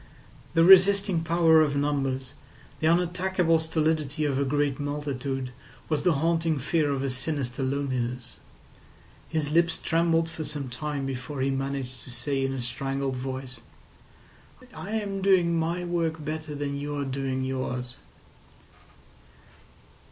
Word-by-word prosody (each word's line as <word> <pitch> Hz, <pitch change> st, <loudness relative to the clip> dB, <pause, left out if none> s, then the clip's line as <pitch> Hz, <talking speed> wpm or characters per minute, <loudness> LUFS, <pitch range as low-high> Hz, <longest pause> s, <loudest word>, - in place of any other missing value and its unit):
The 165 Hz, -, +6 dB
resisting 190 Hz, -1 st, +6 dB
power 165 Hz, -1 st, +5 dB
of 145 Hz, -2 st, +1 dB
numbers, 135 Hz, -2 st, -1 dB, 0.5 s
the 155 Hz, -, +1 dB
unattackable 175 Hz, 0 st, +2 dB
stolidity 155 Hz, -2 st, 0 dB
of 140 Hz, -2 st, 0 dB
a -, -, +2 dB
great 145 Hz, 0 st, 0 dB
multitude, 140 Hz, -3 st, -3 dB, 0.4 s
was 155 Hz, -2 st, +1 dB
the 180 Hz, -, +3 dB
haunting 165 Hz, +1 st, +1 dB
fear 150 Hz, +3 st, +1 dB
of 140 Hz, -2 st, -1 dB
his 135 Hz, -2 st, -1 dB
sinister 135 Hz, -2 st, -2 dB
loneliness. 130 Hz, -2 st, -2 dB, 0.9 s
His 155 Hz, -2 st, -1 dB
lips 170 Hz, +1 st, +3 dB
trembled 165 Hz, 0 st, +2 dB
for 165 Hz, -1 st, -6 dB
some 145 Hz, -3 st, -5 dB
time 140 Hz, +2 st, -3 dB
before 135 Hz, +1 st, -5 dB
he 135 Hz, +1 st, +1 dB
managed 135 Hz, -1 st, -3 dB
to -, -, -11 dB
say 135 Hz, +3 st, -2 dB
in 135 Hz, -, 0 dB
a 135 Hz, -1 st, -3 dB
strangled 135 Hz, +2 st, -2 dB
voice: 130 Hz, 0 st, -5 dB, 1.1 s
"I 205 Hz, -, -6 dB
am 200 Hz, -3 st, -2 dB
doing 185 Hz, -3 st, +4 dB
my 165 Hz, +2 st, -1 dB
work 165 Hz, -3 st, -1 dB
better 155 Hz, -1 st, -4 dB
than 140 Hz, -1 st, -3 dB
you're 145 Hz, 0 st, -3 dB
doing 135 Hz, -1 st, -2 dB
yours." 130 Hz, -1 st, -3 dB
145 Hz, 135 wpm, -27 LUFS, 135-165 Hz, 1.1 s, The